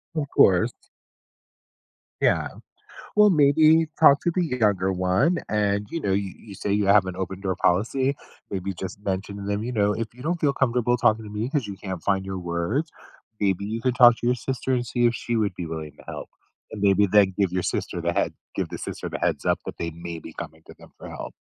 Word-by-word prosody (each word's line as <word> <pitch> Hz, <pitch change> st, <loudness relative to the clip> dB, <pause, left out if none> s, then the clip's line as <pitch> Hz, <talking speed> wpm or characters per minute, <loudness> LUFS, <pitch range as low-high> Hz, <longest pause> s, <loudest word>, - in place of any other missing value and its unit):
Of 150 Hz, -3 st, -1 dB
course. 90 Hz, -8 st, +4 dB, 1.5 s
Yeah, -, -, +2 dB, 0.7 s
well, 210 Hz, 0 st, +7 dB
maybe 155 Hz, +1 st, +5 dB
talk 145 Hz, -3 st, +7 dB
to 175 Hz, -, 0 dB
the 180 Hz, -, +1 dB
younger 105 Hz, -, +1 dB
one 95 Hz, -, +1 dB
and, 105 Hz, -1 st, 0 dB
you 165 Hz, -, -2 dB
know, 100 Hz, -11 st, -1 dB
you 100 Hz, 0 st, -1 dB
you 105 Hz, -3 st, -12 dB
say 100 Hz, -, -4 dB
you 105 Hz, 0 st, +2 dB
have 100 Hz, -1 st, +5 dB
an 95 Hz, -1 st, -5 dB
open-door 95 Hz, 0 st, -3 dB
policy, 120 Hz, +11 st, +1 dB, 0.4 s
maybe 95 Hz, 0 st, -3 dB
just 95 Hz, +1 st, -6 dB
mention 100 Hz, 0 st, -3 dB
to 100 Hz, -, -7 dB
them, 100 Hz, +1 st, -2 dB
"You 125 Hz, -, -3 dB
know, 105 Hz, -2 st, +2 dB
if 115 Hz, +1 st, -3 dB
you 125 Hz, +2 st, -13 dB
don't 170 Hz, +4 st, -1 dB
feel 145 Hz, -3 st, +2 dB
comfortable 125 Hz, -2 st, +1 dB
talking 110 Hz, 0 st, +2 dB
to 105 Hz, -, -9 dB
me 105 Hz, +3 st, -3 dB
'cause 140 Hz, -5 st, -1 dB
you 100 Hz, -, -6 dB
can't 95 Hz, -4 st, -5 dB
find 95 Hz, -1 st, 0 dB
your 95 Hz, -1 st, -4 dB
words, 85 Hz, -, -2 dB, 0.5 s
maybe 100 Hz, -1 st, +1 dB
you 110 Hz, +3 st, -3 dB
could 125 Hz, +1 st, 0 dB
talk 120 Hz, -2 st, +7 dB
to -, -, -4 dB
your 125 Hz, -, +3 dB
sister 130 Hz, +1 st, -2 dB
and 120 Hz, -1 st, -1 dB
see 120 Hz, +2 st, +1 dB
if 120 Hz, -, +2 dB
she 120 Hz, +1 st, -2 dB
would 105 Hz, -4 st, 0 dB
be 90 Hz, -, -5 dB
willing 80 Hz, -2 st, -6 dB
to -, -, -16 dB
help." -, -, -7 dB, 0.4 s
And 105 Hz, -, -7 dB
maybe 100 Hz, 0 st, +4 dB
then 100 Hz, -2 st, +5 dB
give 100 Hz, -3 st, +2 dB
your 90 Hz, 0 st, -1 dB
sister -, -, -3 dB
the -, -, 0 dB
head -, -, 0 dB, 0.2 s
give -, -, -2 dB
the -, -, -6 dB
sister -, -, -6 dB
the -, -, -5 dB
heads-up -, -, 0 dB
that -, -, -7 dB
they 85 Hz, -, -3 dB
may 85 Hz, +1 st, -7 dB
be 80 Hz, 0 st, -11 dB
coming 80 Hz, +1 st, -8 dB
to -, -, -12 dB
them -, -, -16 dB
for -, -, -9 dB
help. -, -, -7 dB
105 Hz, 225 wpm, -24 LUFS, 95-125 Hz, 1.5 s, well